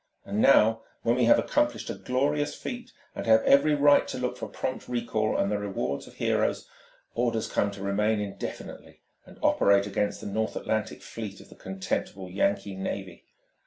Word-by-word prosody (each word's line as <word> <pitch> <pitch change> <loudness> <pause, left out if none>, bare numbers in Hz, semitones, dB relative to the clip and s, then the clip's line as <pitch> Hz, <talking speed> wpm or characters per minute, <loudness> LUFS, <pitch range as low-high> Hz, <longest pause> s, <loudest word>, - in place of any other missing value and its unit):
And 100 +2 -1
now, 115 -4 +5 0.2
when 115 - +3
we 125 -1 +3
have 115 - +6
accomplished 295 0 0
a - - -3
glorious 145 +3 -1
feat 245 0 -7 0.2
and - - -6
have 110 0 +6
every 150 +2 +5
right 145 0 +5
to - - -5
look 125 0 -2
for - - -6
prompt 130 - -4
recall 115 -3 -1
and 100 - +1
the 105 - 0
rewards 100 -8 -3
of - - -15
heroes, - - 0 0.5
orders 115 -2 0
come 100 - +1
to 100 -1 -8
remain 105 +2 +1
indefinitely 100 -1 -7 0.3
and - - -14
operate 100 0 +4
against 100 0 -1
the - - -9
North 110 +2 -2
Atlantic 110 -1 -2
fleet 105 -4 -7
of - - -15
the - - -14
contemptible 95 0 -4
Yankee 100 +1 0
navy! 95 -1 -5
110 Hz, 175 wpm, -27 LUFS, 100-125 Hz, 0.5 s, have